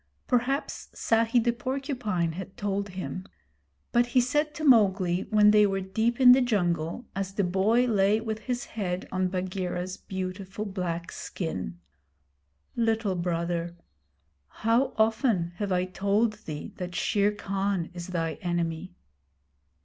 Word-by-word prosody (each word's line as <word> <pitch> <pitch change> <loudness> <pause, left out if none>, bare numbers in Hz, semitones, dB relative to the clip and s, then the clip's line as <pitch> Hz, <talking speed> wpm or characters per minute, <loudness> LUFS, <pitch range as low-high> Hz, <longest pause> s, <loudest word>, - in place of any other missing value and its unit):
Perhaps 255 +3 -1
Sahi 230 +1 +2
the 235 0 +2
Porcupine 250 - -2
had 190 +5 -8
told 200 -2 -2
him; 185 0 -5 0.7
but 240 0 +3
he 240 +1 +3
said 295 +5 +1
to 315 - -5
Mowgli 190 - +4
when 210 -1 +6
they 210 -1 +6
were 195 0 -1
deep 220 +6 -1
in 250 -1 +9
the 260 +1 +7
jungle, 175 -3 0
as 195 -1 -3
the 200 - +1
boy 195 +7 +3
lay 210 -2 +3
with 220 -1 -4
his 245 +3 -3
head 185 -4 -3
on 185 0 +1
Bagheera's 185 0 -3
beautiful 190 +2 -5
black 180 -4 -3
skin: 95 - -5 1.0
'Little 225 -3 +1
Brother,' 170 -1 -2 0.7
how 230 - +1
often 220 -5 +2
have 205 -2 -2
I 180 0 +2
told 200 +4 +1
thee 150 -2 -6
that 180 -1 -5
Shere 205 +2 +2
Khan 195 -3 -2
is 175 -1 -7
thy 165 -3 -2
enemy?' 175 0 -2
195 Hz, 135 wpm, -27 LUFS, 180-225 Hz, 1.0 s, in